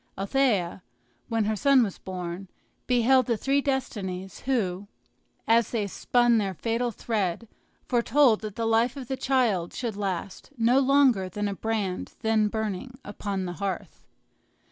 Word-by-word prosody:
Althea, 195 -4 +1 0.5
when 225 -2 0
her 215 +1 0
son 275 +2 +4
was 200 -4 -4
born, 180 0 -6 0.4
beheld 250 +1 +4
the 235 -2 +1
three 275 +5 +1
destinies, 200 -10 -3
who, 205 -7 -1 0.6
as 230 -1 +4
they 220 -4 -1
spun 240 +3 +2
their 195 -3 -2
fatal 235 +5 -1
thread, 215 -2 -2 0.4
foretold 240 0 +3
that 215 -2 -6
the 230 - -2
life 225 +4 +2
of 260 -3 -7
the 265 - -2
child 240 -11 +1
should 235 -5 -3
last 195 -2 -4
no 240 +3 +4
longer 265 -8 +3
than 205 +3 -2
a 200 - -2
brand 205 -3 -3
then 220 -1 +2
burning 220 +4 -4
upon 200 -2 -4
the 175 - -4
hearth. 195 -3 -4
220 Hz, 145 wpm, -26 LUFS, 195-245 Hz, 0.6 s, son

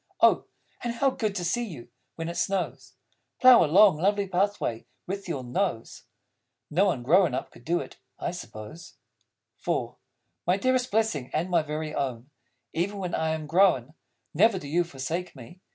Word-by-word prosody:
Oh, - - +4 0.4
and 240 -1 -2
how 270 +3 +2
good 215 -5 -2
to 180 -3 -2
see 240 +8 0
you, 150 - -8 0.3
when 165 0 -4
it 170 - -3
snows, 190 +1 -2 0.4
Plough 255 -2 +8
a - - +1
long, 190 +1 +6
lovely 200 +4 +1
pathway 185 - -1 0.2
with 195 0 -5
your 140 -6 -3
nose! 125 - -3 0.7
(No 180 +7 +3
one 145 -11 0
grown 165 +1 +4
up - - -4
could - - -17
do 170 +4 +1
it, - - -11 0.2
I - - -3
suppose.) 115 -2 -10 0.6
IV - - -2 0.5
My 180 +2 +3
dearest 255 +3 +1
Blessing 210 - 0
and 170 +4 -1
my 170 -2 +4
Very 155 0 -4
Own, 130 -1 -3 0.4
Even 200 +5 -1
when 180 -3 -4
I 160 0 0
am 155 -1 -6
grown, 155 -5 +3 0.4
Never 205 +5 +4
do 145 - -7
you 170 +5 +2
forsake 165 +4 -5
me! 130 +7 -12
175 Hz, 170 wpm, -27 LUFS, 150-200 Hz, 0.7 s, Plough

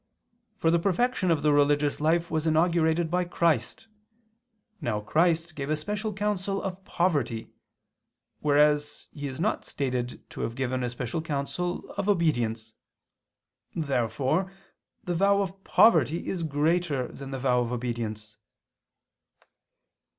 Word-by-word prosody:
For 165 - +2
the 170 - +3
perfection 195 +2 +1
of 155 -4 +2
the 150 -1 +4
religious 145 0 +2
life 165 +2 +1
was 160 0 0
inaugurated 160 0 +2
by 180 +1 +2
Christ. 170 - 0 1.0
Now 110 -3 -1
Christ 165 +7 +1
gave 140 -2 -5
a 155 - +2
special 210 +7 -3
counsel 200 -1 -1
of 190 0 -5
poverty; 145 -12 -1 0.9
whereas 150 0 +2
He 145 -1 -5
is 130 +2 -7
not 210 +6 0
stated 125 -3 -3
to - - -6
have 115 - -3
given 130 -1 -1
a 120 - -1
special 120 +5 -3
counsel 160 +4 -3
of 200 0 -1
obedience. 120 - 0 1.0
Therefore 140 - 0 0.5
the 180 -4 -2
vow 200 +3 +3
of 195 +1 -8
poverty 170 -7 +4
is 185 - -2
greater 155 -2 0
than 135 -1 -9
the 135 - -4
vow 125 -1 +2
of 120 0 -2
obedience. 115 -3 -4
155 Hz, 130 wpm, -27 LUFS, 130-175 Hz, 1.0 s, the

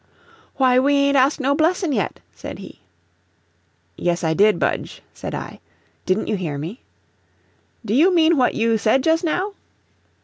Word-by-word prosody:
"Why, 255 -2 +3
we 285 +2 +2
ain't 280 0 +2
asked 275 +3 +3
no 275 +1 +1
blessin' 325 +3 +1
yet," 205 -8 -2
said - - -9
he. - - -12 1.2
"Yes, 175 0 -2
I 160 -1 +1
did, 205 +5 +3
Budge," - - -3
said - - -6
I. - - -8 0.5
"Didn't 190 +3 0
you 215 - -2
hear 160 -6 -4
me?" 170 - -7 1.0
"Do 205 - -2
you 320 +10 +4
mean 335 -1 +4
what 255 -4 +1
you 225 0 +1
said 235 +5 +2
just 325 +2 +2
now?" 370 +5 -1
260 Hz, 160 wpm, -21 LUFS, 210-315 Hz, 1.2 s, you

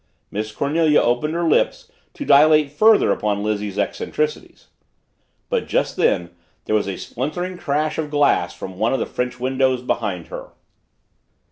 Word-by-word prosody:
Miss 110 +1 -4
Cornelia 150 +5 +2
opened 125 +7 0
her 170 0 0
lips 155 - +1 0.2
to - - -6
dilate 150 0 +5
further 215 +7 +4
upon 105 -1 -1
Lizzie's 105 -2 -2
eccentricities. 150 +8 -3 0.8
But - - -1
just - - 0
then 85 -1 +1 0.3
there - - -2
was 105 -2 +1
a 95 - -4
splintering 175 +9 -4
crash 155 0 -1
of 155 -2 -2
glass 145 -1 +2
from 95 -1 -8
one 115 +3 +1
of 135 - 0
the - - -1
French 125 0 -4
windows 130 0 0
behind 90 -8 -3
her! - - -9
130 Hz, 150 wpm, -21 LUFS, 105-150 Hz, 0.8 s, dilate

